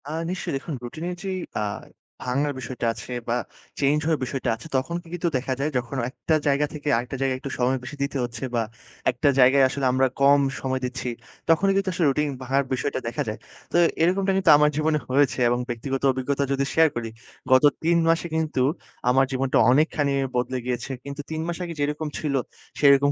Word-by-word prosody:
আ - - -4 0.2
নিশ্চয়ই 185 -4 -3
দেখুন 150 +4 -6
রুটিনের 160 +9 -5
যেই 190 -1 -2 0.2
আ - - 0 0.7
ভাঙ্গার 140 +3 0
বিষয়টা 125 0 -4
আছে 125 - -9 0.2
বা 120 - +2 0.4
চেঞ্জ 145 +2 +3
হওয়ার 160 -1 +1
বিষয়টা 130 0 -2
আছে, 120 - -11
তখন 135 +6 -2
কি 170 - -19
কিন্তু 175 0 -1
দেখা 130 +1 -2
যায় 150 +3 0
যখন 125 +2 -3
একটা 155 +4 -1
জায়গা 140 +1 +3
থেকে 150 -1 -7
আরেকটা 125 +3 -4
জায়গায় 135 -1 +1
একটু 140 - -6
সময় 130 +2 +2
বেশি 130 +3 -7
দিতে 140 0 -2
হচ্ছে। 120 +1 -5
বা 115 - +2 0.5
একটা 125 +3 +1
জায়গায় 135 +2 +6
আসলে 135 0 -2
আমরা 130 +1 +3
কম 140 +1 +6 0.2
সময় 130 -1 -1
দিচ্ছি, 125 0 -3 0.4
তখনই 180 +5 +4
কিন্তু 195 -1 +1
আসলে 170 -1 +1
রুটিন 150 +2 +1
ভাঙার 135 +2 +1
বিষয়টা 130 +1 -1
দেখা 115 - -2
যায়। 110 +1 -4 0.3
তো - - +2 0.2
এরকমটা 190 +3 +2
কিন্তু 185 -3 +2
আমার 150 0 +4
জীবনে 155 0 +1
হয়েছে 135 +1 +2
এবং 120 +1 +1
ব্যক্তিগত 130 +3 -3
অভিজ্ঞতা 135 +2 -1
যদি 140 0 +1
শেয়ার 160 0 +5
করি, 115 -1 -3 0.4
গত 130 +1 +6 0.2
৩ 170 +1 +3
মাসে 165 +1 +2
কিন্তু 155 -5 0 0.5
আমার 135 +2 +4
জীবনটা 130 0 +1
অনেকখানি 145 0 +2 0.2
বদলে 125 +1 0
গিয়েছে। 125 +1 -3
কিন্তু 140 +1 -6
৩ 160 0 -2
মাস 175 - -3
আগে 170 -1 -5
যেরকম 150 +2 -1
ছিল 150 -3 -2 0.5
সেরকম 140 -1 +6
140 Hz, 190 wpm, -24 LUFS, 130-155 Hz, 0.7 s, জায়গায়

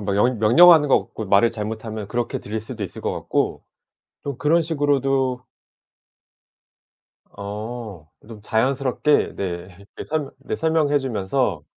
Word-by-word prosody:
며 100 -1 -2
영 120 +3 +2
명령하는 150 +8 +7
것 - - +5
같고 110 - -7
말을 100 +4 +4
잘못하면 110 -1 -5
그렇게 120 +2 -2
들릴 110 +2 -4
수도 110 0 -7
있을 95 - -6
것 - - -2
같고 - - -2 0.6
좀 140 -3 -5
그런 165 +3 +3
식으로도 135 -5 0 1.9
어. 105 -4 -7 0.2
좀 110 -2 -10
자연스럽게 130 +6 +1
네 100 - -3 0.3
이렇게 100 - -11
설명 150 -3 -3
네 140 - -5
설명해 160 -3 +2
주면서 115 - -1
120 Hz, 275 characters per minute, -22 LUFS, 105-140 Hz, 1.9 s, 명령하는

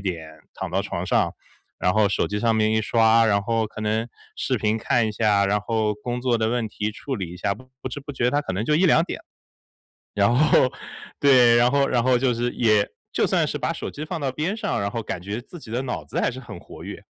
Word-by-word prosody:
点 80 -5 -5
躺 - - -5
到 - - 0
床 - - -4
上， - - +1 0.5
然 90 - +2
后 110 -1 +3
手 100 - 0
机 105 - -2
上 115 +1 +2
面 110 0 +2
一 110 - +2
刷， 115 +1 +4
然 100 -2 +2
后 115 +1 0
可 110 - -10
能 110 +2 -1 0.3
视 130 - -1
频 110 +1 0
看 115 0 +1
一 - - -2
下， 105 -2 +2
然 105 +1 +2
后 110 0 0
工 120 +3 -4
作 120 -2 +1
的 110 0 +1
问 120 -2 -1
题 105 +1 -3
处 135 +4 -5
理 95 -5 -4
一 - - -9
下， 100 +2 -1
不 130 +4 -15 0.2
知 145 - -5
不 145 +1 -8
觉 125 -1 +1
它 145 - +1
可 145 - -4
能 100 +4 -2
就 150 - +2
1-2 165 -2 +4
点。 - - -5 0.9
然 100 +3 +3
后 135 -2 +4 0.5
对， 125 -4 +6
然 120 +2 +4
后 140 -1 +3
然 120 -2 +1
后 130 0 +4
就 125 0 +1
是 120 +1 -1
也 110 -4 +3 0.3
就 - - +2
算 - - +1
是 - - -3
把 - - -1
手 - - -5
机 150 - -7
放 155 - -4
到 135 -3 -2
边 170 +9 -2
上， 215 - -2
然 100 - -2
后 115 - -3
感 90 -5 -5
觉 100 +5 -4
自 175 - -12
己 110 - -12
的 125 +2 -1
脑 125 - -4
子 - - -4
还 - - +2
是 130 +1 -8
很 125 - -10
活 - - -12
跃。 - - -8
115 Hz, 265 characters per minute, -23 LUFS, 105-125 Hz, 0.9 s, 对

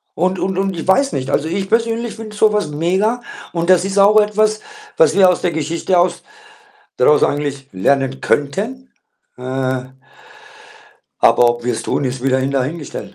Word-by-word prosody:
Und 185 +2 0
und 190 0 -2
und 195 -2 -1
ich 165 - -6
weiß 275 +9 +2
nicht. 130 0 -3
Also, 150 +2 0
ich 190 +3 -3
persönlich 230 0 -1
finde 215 -2 -9
so 210 0 +3
was 210 -7 0
mega 190 +10 0 0.3
und 170 0 -2
das 180 -1 +4
ist 195 +1 -3
auch 205 +2 +6
etwas, 215 +1 +1 0.4
was - - +3
wir 190 -2 +6
aus 180 - +1
der 175 - +1
Geschichte 165 +4 -1
aus 175 0 +1 0.8
daraus 150 +4 +4
eigentlich 140 -2 -3
lernen 135 +7 0
könnten. 220 - -2 0.5
Äh 130 0 -3 1.3
aber 120 - +5
ob 120 0 -2
wir's 120 -2 -2
tun, - - -1
ist 130 0 -4
wieder 130 0 +2
hin 135 +1 -1
dahingestellt. 140 +3 -4
175 Hz, 170 wpm, -17 LUFS, 135-210 Hz, 1.3 s, auch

